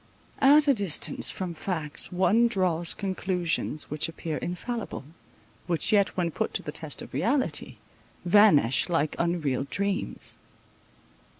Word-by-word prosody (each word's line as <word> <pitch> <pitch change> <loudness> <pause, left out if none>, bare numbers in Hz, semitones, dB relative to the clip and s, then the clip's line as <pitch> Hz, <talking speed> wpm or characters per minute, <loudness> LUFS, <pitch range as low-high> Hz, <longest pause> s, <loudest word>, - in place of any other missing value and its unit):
At 290 +2 +6
a 280 - +6
distance 200 - +1
from 185 -2 -4
facts 160 -3 -3
one 200 +6 +3
draws 180 -6 +1
conclusions 180 -6 -1
which 150 +2 -1
appear 160 -1 -5
infallible, 220 - -5 0.6
which 170 -3 0
yet 200 -2 +2
when 170 -2 0
put - - -3
to - - -2
the 150 - -5
test 150 -1 -6
of - - -13
reality, 235 - -1 0.5
vanish 175 - +4
like 160 -3 0
unreal 160 -6 -1
dreams. 200 +1 -3
180 Hz, 125 wpm, -27 LUFS, 160-200 Hz, 0.6 s, At